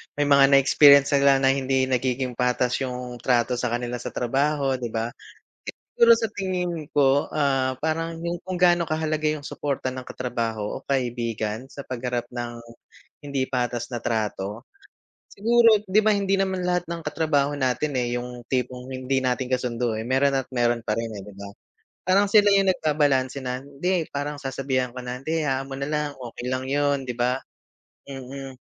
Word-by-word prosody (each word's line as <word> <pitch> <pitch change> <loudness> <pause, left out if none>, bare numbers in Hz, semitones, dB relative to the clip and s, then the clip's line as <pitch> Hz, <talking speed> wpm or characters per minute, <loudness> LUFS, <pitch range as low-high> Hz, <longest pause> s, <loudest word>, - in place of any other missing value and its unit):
may 145 0 0
mga 140 -1 +6
na-experience 140 +1 +7
silang 140 -1 +4
na 135 - +5
hindi 130 -1 0
nagiging 125 0 -1
patas 125 0 +1
yung 125 -1 -5
trato 125 0 +1
sa 120 -1 -1
kanila 120 0 -2
sa - - -6
trabaho, 135 +2 0
'di 125 -1 -4
ba? 115 0 -1 0.9
Siguro 235 0 +7
sa 225 -1 -1
tingin 180 -6 -3
ko? 140 0 +3
Ah, 135 -3 +1
parang 165 +1 -2
yung 170 0 -3
kung 185 0 -4
gaano 175 -1 +4
kahalaga 155 -1 0
yung 150 -1 -3
suporta 140 -2 -3
ng 130 0 -7
katrabaho 115 -3 -3
o - - -27
kaibigan 120 -3 -2
sa 140 0 -9
pagharap 125 -1 -3
ng 120 -1 -5 0.6
hindi 140 -2 -1
patas 120 -2 -2
na 120 - -3
trato. 110 0 -2 0.7
Siguro 230 0 +4
'di 200 +3 +5
ba 215 - +5
hindi 195 -1 +1
naman 190 -1 0
lahat 180 -1 0
ng 170 0 -4
katrabaho 145 -3 +1
natin 135 +2 0
eh, 120 -1 -1
yung 125 0 -7
tipong 125 0 -3
hindi 130 +1 -1
natin 125 0 -1
kasundo 120 -2 -1
eh 110 - -4
meron 135 +2 +2
at 135 - -3
meron 120 -1 +1
pa 105 - 0
rin 115 - -1
eh 100 - -7
di 105 - -11
ba? 100 0 -8 0.6
Parang 195 +3 +3
sila 205 0 +5
yung 195 -1 +4
nag 185 - +1
babalanse 140 -3 +2
na 125 0 -3
hindi 165 +5 -1
parang 145 +1 -3
sasabihan 130 -2 -2
ko 125 - -7
na 125 0 -5
hindi 160 +4 -1
hayaan 135 -1 -1
mo 135 - -6
na 140 - -3
lang 150 -1 -1
okey 120 0 -7
lang 130 0 -2
yun, 140 -1 +1
'di 125 - -3
ba? 125 +1 +1 0.7
Mm. 135 0 -8
135 Hz, 180 wpm, -24 LUFS, 125-150 Hz, 0.9 s, na-experience